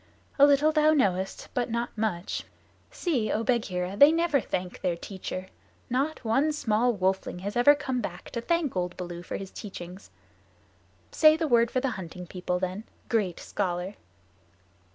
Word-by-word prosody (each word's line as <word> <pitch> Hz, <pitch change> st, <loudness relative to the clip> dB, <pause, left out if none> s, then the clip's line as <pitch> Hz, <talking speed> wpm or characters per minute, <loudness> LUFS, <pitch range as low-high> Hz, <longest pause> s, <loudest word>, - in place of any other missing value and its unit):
"A 285 Hz, -, +9 dB
little 290 Hz, +2 st, +4 dB
thou 310 Hz, 0 st, +4 dB
knowest, 190 Hz, -9 st, 0 dB
but 245 Hz, -1 st, -1 dB
not 235 Hz, +1 st, -2 dB
much. 210 Hz, -5 st, -2 dB, 0.5 s
See, 250 Hz, -, -1 dB
O 220 Hz, -, 0 dB
Bagheera, 195 Hz, -6 st, -1 dB
they 285 Hz, +8 st, +8 dB
never 330 Hz, -4 st, +2 dB
thank 180 Hz, -3 st, -4 dB
their 180 Hz, -2 st, 0 dB
teacher. 185 Hz, 0 st, -6 dB, 0.4 s
Not 275 Hz, +2 st, -1 dB
one 270 Hz, +8 st, +2 dB
small 240 Hz, -3 st, +2 dB
wolfling 190 Hz, -3 st, -1 dB
has 200 Hz, +2 st, -4 dB
ever 245 Hz, +5 st, +6 dB
come 265 Hz, -4 st, -2 dB
back -, -, -7 dB
to 235 Hz, -, -3 dB
thank 330 Hz, -, 0 dB
old 180 Hz, -1 st, -2 dB
Baloo 175 Hz, -1 st, -6 dB
for 175 Hz, -, -5 dB
his 195 Hz, -1 st, -8 dB
teachings. 185 Hz, -2 st, -9 dB, 1.0 s
Say 310 Hz, 0 st, +6 dB
the 325 Hz, -1 st, 0 dB
word 235 Hz, -3 st, +4 dB
for 255 Hz, -, 0 dB
the 270 Hz, -1 st, 0 dB
Hunting 180 Hz, +1 st, -8 dB
People, 180 Hz, 0 st, -3 dB
then 185 Hz, +4 st, -3 dB, 0.2 s
great 205 Hz, -7 st, 0 dB
scholar." 180 Hz, 0 st, -3 dB
220 Hz, 160 wpm, -27 LUFS, 185-275 Hz, 1.0 s, A